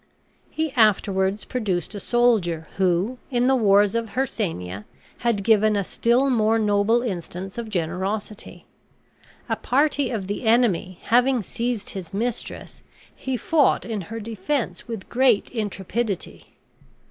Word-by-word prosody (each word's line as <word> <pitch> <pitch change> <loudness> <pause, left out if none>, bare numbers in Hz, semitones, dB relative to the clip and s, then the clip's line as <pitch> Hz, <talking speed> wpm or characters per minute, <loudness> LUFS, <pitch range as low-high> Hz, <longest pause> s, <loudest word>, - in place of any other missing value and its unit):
He 315 -1 -2
afterwards 200 -4 +2
produced 195 - -2
a 205 - -5
soldier 200 -10 +1
who, 190 +6 +1
in 245 -2 +1
the 265 +1 +4
wars 205 -3 +4
of 230 -3 -3
Hircania, 160 - -3 0.3
had 230 -5 0
given 215 0 +4
a 200 - +1
still 240 +7 +2
more 225 -2 +3
noble 215 +2 +2
instance 190 -1 -5
of 230 -2 -5
generosity. 190 +3 -4 0.8
A - - 0
party 285 0 +1
of 215 -6 -3
the 205 +5 -4
enemy 220 -6 +2
having 245 0 +3
seized 235 +2 -2
his 190 -2 -7
mistress, 235 +3 -4 0.3
he 260 -1 -3
fought 315 0 +2
in 220 -3 -3
her 225 0 -5
defense 225 +6 -3
with 225 -5 -6
great 245 -4 +2
intrepidity. 210 -1 -4
220 Hz, 130 wpm, -23 LUFS, 195-240 Hz, 0.8 s, the